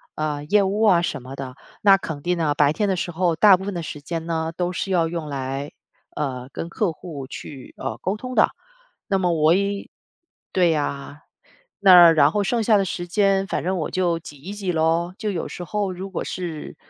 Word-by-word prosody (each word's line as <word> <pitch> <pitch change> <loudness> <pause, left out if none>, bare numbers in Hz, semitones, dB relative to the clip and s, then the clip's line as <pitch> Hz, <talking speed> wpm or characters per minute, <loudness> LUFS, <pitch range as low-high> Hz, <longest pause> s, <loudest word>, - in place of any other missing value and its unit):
呃， 150 -1 -2
业 205 +6 +3
务 200 +3 -1
啊 190 -6 +5
什 155 - -3
么 130 +2 -9
的。 135 -2 -7 0.3
那 200 -1 +8
肯 160 -6 -5
定 175 0 0
呢， 150 -3 +1
白 145 0 +3
天 205 +2 0
的 190 - +1
时 175 0 -3
候， 170 -1 +1
大 200 +2 +7
部 190 - -6
分 200 - -3
的 170 - -3
时 150 -1 -7
间 165 +2 -4
呢， 160 -1 -2
都 180 0 -1
是 195 - -3
要 175 -3 +2
用 165 -2 -4
来， 135 0 -4 0.4
呃， 130 -3 -4
跟 165 - -5
客 185 0 0
户 150 -5 -8
去， 135 -1 -10
呃， - - -5
沟 195 +4 -1
通 255 +3 -7
的。 - - +5 0.6
那 195 -3 +1
么 180 -2 +1
我 160 0 +4
也 200 +1 -1 0.6
对 175 -3 +3
啊， 145 0 -4 0.6
那， 180 -4 +9
然 150 -2 +5
后 210 - +1
剩 230 +3 0
下 215 0 +4
的 200 - +2
时 175 -1 -4
间， 195 0 +2
反 - - -3
正 185 +1 0
我 155 - -3
就 175 -3 0
挤 150 -2 -12
一 170 +9 -9
挤 195 -3 -3
咯。 165 +2 +1
就 215 -2 -3
有 175 -4 -3
时 175 - -7
候 205 +1 -2
如 190 +2 -7
果 185 - -3
是， 165 -4 -6
175 Hz, 235 characters per minute, -23 LUFS, 155-195 Hz, 0.6 s, 那